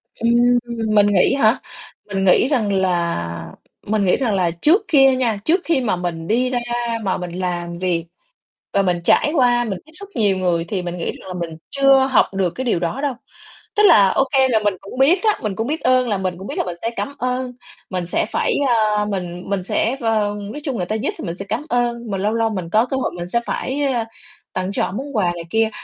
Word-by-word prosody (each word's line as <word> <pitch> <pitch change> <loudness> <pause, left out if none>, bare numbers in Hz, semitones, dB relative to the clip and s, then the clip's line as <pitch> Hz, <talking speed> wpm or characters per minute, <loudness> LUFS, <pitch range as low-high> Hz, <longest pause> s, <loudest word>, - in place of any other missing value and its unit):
Ừm, 240 +1 +3 0.4
mình 205 -1 +6
nghĩ 200 -3 +3
hả, 225 -4 +3 0.4
mình 195 -2 -2
nghĩ 195 +6 +5
rằng 225 -8 +1
là 175 - 0 0.6
mình 210 -2 +1
nghĩ 180 - +4
rằng 245 -6 0
là 180 -3 +1
trước 300 - +3
kia 270 -4 +5
nha, 235 -5 0
trước 345 +4 +3
khi 320 -5 +1
mà 225 -6 0
mình 170 -2 -4
đi 245 +5 +1
ra 250 -1 0 0.4
mà 190 - 0
mình 180 -1 -6
làm 175 -1 -3
việc 175 -2 -1 0.7
và 200 - +3
mình 180 -3 0
trải 295 - +3
qua, 245 -3 +3
mình 200 -6 -4
tiếp 315 - -19
xúc 400 0 -10
nhiều 205 -5 +2
người, 175 -3 0
thì 190 -1 -2
mình 175 0 -5
nghĩ 170 - -4
rằng - - -13
là 185 - -5
mình 170 -2 -5
chưa 275 -1 +4
học 245 - +5
được 190 -2 +1
cái 260 - -3
điều 225 -8 +1
đó 175 +11 -2
đâu. 285 -2 0 0.6
Tức 420 - +4
là, 205 - +7
ô 270 - +2
kê, 265 -1 +5
là 230 -4 +2
mình 205 -2 0
cũng 200 +6 -9
biết 330 +9 +4
á, 430 -2 +2
mình 210 -3 -2
cũng 225 +4 -2
biết 315 +2 -2
ơn 255 0 +3
là 205 - +1
mình 185 -2 -2
cũng 190 +2 -8
biết - - -6
là - - +1
mình 175 -2 -4
sẽ 230 - -1
cảm 280 - -3
ơn, 250 0 -2 0.4
mình 180 -2 -3
sẽ 175 - 0
phải, - - 0
à, 215 -3 +2
mình 180 -3 -4
mình 200 -2 -1
sẽ, 225 +6 0
ờ, 215 -3 +1 0.2
nói 295 - -6
chung 270 -5 -2
người 180 - -1
ta 215 - -2
giúp 220 - -1
thì - - -6
mình 170 -2 -4
sẽ 195 - -7
cảm 300 - -2
ơn, 240 -2 -1
mình 195 -1 -2
lâu 210 +2 +1
lâu 225 0 +1
mình 185 -6 -4
có 220 +6 +3
cơ 265 +1 -2
hội - - -1
mình 175 0 -5
sẽ 235 +6 +1
phải, 280 +3 -2
ơ, 230 -2 -1 0.5
tặng, 185 +1 -2
cho - - 0
họ - - -2
món 270 +7 -6
quà 200 - +2
này 170 -1 -6
kia. 225 +3 +2
210 Hz, 245 wpm, -20 LUFS, 185-255 Hz, 0.7 s, là